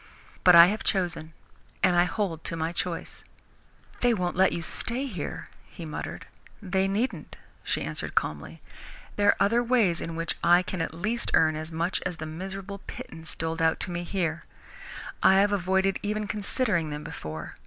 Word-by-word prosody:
But 180 -1 +8
I 170 0 +11
have 210 +4 -1
chosen, 175 -5 0 0.5
and 180 -2 +5
I 175 0 +5
hold 180 -5 -2
to - - -3
my 160 0 -1
choice." 175 -1 -4 0.8
"They 245 -1 +3
won't 180 -3 -1
let 190 +1 +4
you 170 - -3
stay 240 - -2
here," 185 - -6 0.2
he 170 - -9
muttered. 155 - -6 0.3
"They 190 -1 0
needn't," 200 - -2 0.3
she - - -1
answered - - -5
calmly. 75 -1 -2 0.5
"There 205 0 +2
are - - +6
other 225 +4 +3
ways 230 -9 +2
in 165 - -4
which 165 0 -1
I 175 +1 +6
can 180 -1 -4
at 165 - -3
least 215 +8 -2
earn 155 -1 +4
as 155 +1 -5
much 170 +3 -1
as 180 -2 -3
the 155 - -5
miserable 190 +5 -6
pittance 160 0 -8
doled 165 +1 -3
out 160 0 +3
to - - +1
me 175 0 -3
here. 170 -3 -2 0.8
I 190 - +6
have 200 +1 +4
avoided 190 0 +1
even 210 +1 -2
considering 205 - 0
them 150 0 -5
before. 80 +1 -7
180 Hz, 175 wpm, -27 LUFS, 165-200 Hz, 0.8 s, I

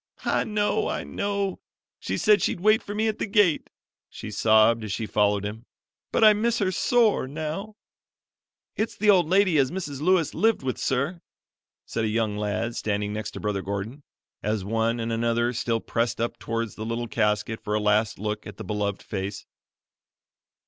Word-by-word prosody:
"I - - +1
know, 210 - 0
I - - -2
know: 200 -2 -2 0.4
she 95 - -3
said 210 - +4
she'd - - 0
wait 215 +4 +4
for 205 - -7
me 220 +1 +1
at 215 - -2
the - - -1
gate," 200 -6 +3 0.4
she 105 - -8
sobbed 110 +2 +4
as 105 - -5
she 110 - -2
followed 105 -1 +1
him; 110 +3 -6 0.4
"but - - +2
I 215 -1 +9
miss 230 +3 +1
her 190 -3 +1
sore 220 - +2
now." 160 +9 -5 1.0
"It's 220 - -2
the 210 0 +5
old 175 -5 +3
lady 185 -4 +4
as 130 -2 +3
Mrs. 150 -6 -5
Lewis 175 -2 +2
lived 225 -7 +2
with 130 -1 -2
sir," 140 +7 -1 0.6
said 115 - -3
a - - +1
young 110 -1 0
lad 105 +3 -2
standing 105 -1 -2
next 105 0 -4
to - - -5
Brother 105 -2 -2
Gordon, 100 +8 -5 0.4
as 105 -2 -1
one 115 +2 0
and 115 0 -2
another 120 +1 +1
still 115 -1 0
pressed 115 +1 -1
up 115 +1 -2
towards 115 -1 -3
the 110 - -7
little 115 +1 -3
casket 105 +1 0
for 105 - -1
a - - +2
last 105 +1 +2
look 105 +2 -4
at 105 -2 -10
the - - -6
beloved 105 -2 -2
face. 95 +2 -5
115 Hz, 185 wpm, -25 LUFS, -, 1.0 s, I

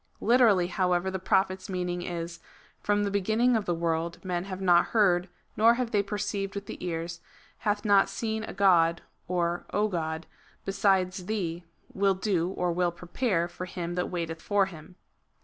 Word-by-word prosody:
Literally, 225 -6 +4
however, 180 0 0
the 190 - -3
Prophet's 190 0 0
meaning 180 -1 -2
is: 170 -1 -5 0.4
"From 205 0 +1
the 200 - -1
beginning 220 +5 +2
of 215 -2 0
the 175 - 0
world 165 0 -1
men 180 -1 -2
have 190 -1 -6
not 175 -2 +4
heard, 185 -5 +2 0.3
nor 230 +2 +5
have 245 -2 -2
they 205 - +3
perceived 200 -1 -3
with 200 0 -5
the - - -8
ears, 170 -1 -4 0.4
hath 205 -1 -1
not 200 -2 +5
seen 220 +2 -3
a - - -6
god, 175 -4 +3 0.2
(or 175 -1 -1
God,) 170 -6 -1 0.4
besides 190 -2 +1
thee, 175 -5 -3 0.3
will 195 0 +2
do 185 -3 0
(or 180 -2 -1
will 175 0 +1
prepare) 175 +1 -1
for 175 +1 -7
him 175 -1 -5
that 180 0 -1
waiteth 165 -2 -4
for 205 -1 +2
him." 175 -1 -11
185 Hz, 165 wpm, -28 LUFS, 175-200 Hz, 0.4 s, nor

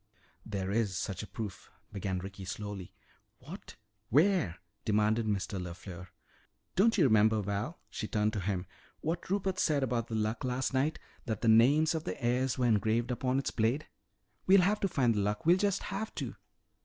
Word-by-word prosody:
"There 100 -2 -3
is 105 -4 0
such 95 +1 -3
a 105 - -7
proof," 100 -6 -7 0.2
began 95 -2 -2
Ricky 95 +2 -7
slowly. 100 0 -6 0.5
"What? - - -10 0.3
Where?" 155 - +3 0.3
demanded 110 +1 +2
Mr. 100 -2 -1
LeFleur. 90 0 -8 0.7
"Don't 225 +4 +4
you 180 - +5
remember, 110 -3 +4
Val," 100 - -3
she 105 - -5
turned 105 0 +1
to 105 - -1
him, 95 -1 -2 0.4
"what 170 +3 -3
Rupert 190 -1 0
said 145 -6 +2
about 120 -3 -1
the 110 - -4
Luck 110 +1 -1
last 130 +1 -1
night 140 +4 +1 0.3
that 110 -3 -2
the 115 - 0
names 140 +9 +5
of 160 -1 -3
the 90 - -4
heirs 125 +2 +1
were 125 - +1
engraved 115 +2 +2
upon 125 +1 0
its 135 - -1
blade? 120 +7 0 0.6
We'll 195 0 +7
have 205 +4 +2
to 195 - +1
find 130 -10 +2
the 105 - 0
Luck! 105 +4 -1
We'll 175 +2 +6
just 200 0 0
have 210 +2 -4
to!" - - -4
115 Hz, 180 wpm, -31 LUFS, 100-150 Hz, 0.7 s, We'll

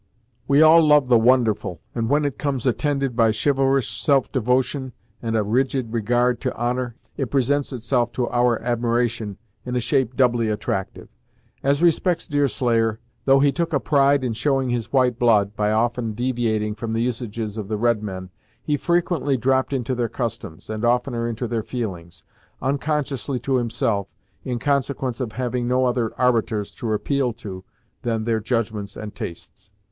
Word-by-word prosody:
We 140 +2 +5
all 160 +1 +7
love 150 -4 +4
the 120 -2 +6
wonderful, 115 - +2
and 115 -1 -2
when 145 +1 +2
it 135 -6 -3
comes 135 -4 -2
attended 135 0 0
by 115 -2 +4
chivalrous 135 +2 +1
self 140 -3 +1
devotion 130 +1 0 0.3
and 115 -1 -1
a 110 - +2
rigid 125 +2 0
regard 120 +2 +1
to 130 - -2
honor, 120 0 -2 0.2
it 135 -5 -2
presents 140 +1 +1
itself 120 -1 0
to 125 -2 -1
our 120 -1 +2
admiration 120 -3 -1 0.3
in 125 0 -4
a - - +2
shape 130 -1 0
doubly 120 -3 +2
attractive. 105 -2 -3 0.5
As 140 +4 +1
respects 175 +1 +2
Deerslayer, 120 -6 +1 0.3
though 135 0 +5
he 140 0 +4
took 165 +3 -2
a 140 - +3
pride 140 -1 +3
in 120 -3 -1
showing 135 +2 0
his 120 -1 -2
white 125 -3 +2
blood, 105 -4 +3
by 105 0 +1
often 115 0 0
deviating 115 -3 -1
from 110 +1 -5
the 115 - 0
usages 115 -3 -3
of 105 -3 -5
the 105 0 -2
red 115 -1 +2
men, 95 -3 -6 0.3
he 150 -1 0
frequently 170 -4 +1
dropped 130 +2 +1
into 130 -2 -1
their 120 -2 -1
customs, 115 -9 -5
and 110 +1 -4
oftener 120 0 +1
into 120 +1 -3
their 115 -1 -1
feelings, 90 -9 -6 0.4
unconsciously 140 -1 -1
to 130 +2 0
himself, 115 -4 -1 0.4
in 125 -2 -2
consequence 135 -2 -1
of 115 -4 -3
having 125 0 -2
no 130 +1 +2
other 120 -2 0
arbiters 115 -4 +1
to 115 - -4
appeal 125 +3 0
to, 100 -5 -8 0.4
than 115 -2 -1
their 115 0 0
judgments 110 -3 -2
and 105 -1 -7
tastes. 95 +3 -8
120 Hz, 165 wpm, -22 LUFS, 110-135 Hz, 0.5 s, all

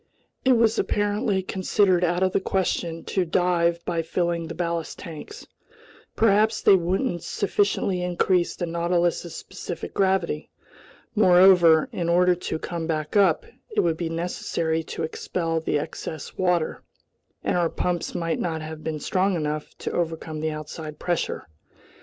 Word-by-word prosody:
It 260 - +5
was 230 -1 +3
apparently 205 -1 0
considered 185 -1 +2
out 175 +1 +1
of 185 - +2
the - - +2
question 175 -3 -1
to 190 - 0
dive 170 -1 +1
by 170 -2 0
filling 170 0 -1
the 165 - -6
ballast 170 -1 -2
tanks. 165 -5 -9 0.7
Perhaps 220 0 +3
they - - +7
wouldn't 180 +2 0
sufficiently 200 -1 0
increase 180 0 +1
the 175 - -2
Nautilus's 170 0 0
specific 175 - -7
gravity. 190 -5 0 0.6
Moreover, 180 -5 +6
in 170 -1 -2
order 180 +1 +4
to 175 -2 -4
come 165 0 -4
back 155 0 -2
up, 205 - +4 0.2
it 430 - +1
would 165 -2 +1
be 170 -1 -2
necessary 165 -1 -1
to - - -5
expel 165 +1 -2
the 160 -2 0
excess 155 +1 -6
water, 180 -3 0 0.6
and - - 0
our 175 -2 +2
pumps 175 0 -2
might 165 -1 -1
not 160 -2 -2
have 155 0 -7
been 155 -1 -3
strong 190 +5 +1
enough 150 -2 -3
to - - -4
overcome 160 -2 -3
the 155 +1 -1
outside 155 0 -7
pressure. 175 +1 -2
175 Hz, 145 wpm, -25 LUFS, 165-185 Hz, 0.7 s, they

